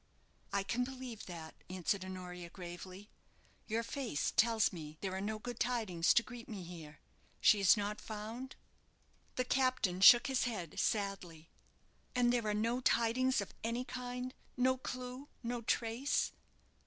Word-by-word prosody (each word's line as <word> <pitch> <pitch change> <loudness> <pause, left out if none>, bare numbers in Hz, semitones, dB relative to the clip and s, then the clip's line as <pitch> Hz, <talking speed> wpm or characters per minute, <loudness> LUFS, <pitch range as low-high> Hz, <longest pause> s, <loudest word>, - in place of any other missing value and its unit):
"I 200 0 +1
can 235 +6 0
believe 255 -3 -7
that," 165 -3 -7 0.2
answered 185 +1 -1
Honoria, 180 -2 -7
gravely. 185 +3 -9 0.6
"Your 230 +1 0
face 235 - -2
tells 225 -3 +4
me 155 -3 -8
there 190 -2 -2
are 190 - -2
no 215 +2 -2
good 240 +2 -6
tidings 215 -9 +2
to 235 - +5
greet 245 -1 -10
me 200 -5 -5
here. 165 -3 -10 0.4
She 210 - +6
is 195 +1 +6
not 205 +1 -2
found?" 225 +5 -6 0.8
The 255 - 0
captain 255 -9 +1
shook 240 +4 +10
his 265 -2 +1
head 195 -10 -4
sadly. 195 -6 -2 0.6
"And 245 -1 +4
there 235 -3 +1
are 210 - +1
no 230 +4 +1
tidings 250 0 +3
of 200 - -7
any 235 +2 -1
kind? 250 0 -5 0.2
no 260 +1 +4
clue, 255 +1 -6 0.2
no 240 0 -2
trace?" 235 +4 +1
220 Hz, 150 wpm, -35 LUFS, 185-245 Hz, 0.8 s, shook